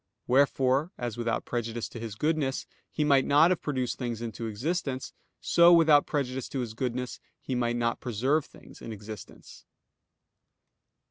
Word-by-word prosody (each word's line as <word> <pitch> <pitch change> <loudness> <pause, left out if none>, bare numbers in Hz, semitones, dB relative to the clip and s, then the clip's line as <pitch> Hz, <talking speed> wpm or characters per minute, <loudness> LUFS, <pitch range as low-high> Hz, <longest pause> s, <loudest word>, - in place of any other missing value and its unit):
Wherefore, 135 +3 +2
as 120 -3 -4
without 115 -1 -2
prejudice 120 -1 -3
to 115 - -8
His 110 -2 -6
goodness, 150 0 0 0.3
He 155 - 0
might 140 -3 +4
not 150 +6 +5
have 185 - 0
produced 130 -4 -2
things 120 -3 -3
into 115 0 -5
existence, 130 - -3 0.3
so, 170 0 +5
without 160 -4 +6
prejudice 130 -3 -2
to 135 - -3
His 115 -3 -5
goodness, 125 +1 -3 0.2
He 130 - -5
might 120 -1 0
not 115 0 0
preserve 130 +6 0
things - - -16
in 115 - -7
existence. 105 -2 -10
125 Hz, 150 wpm, -28 LUFS, 115-145 Hz, 0.3 s, without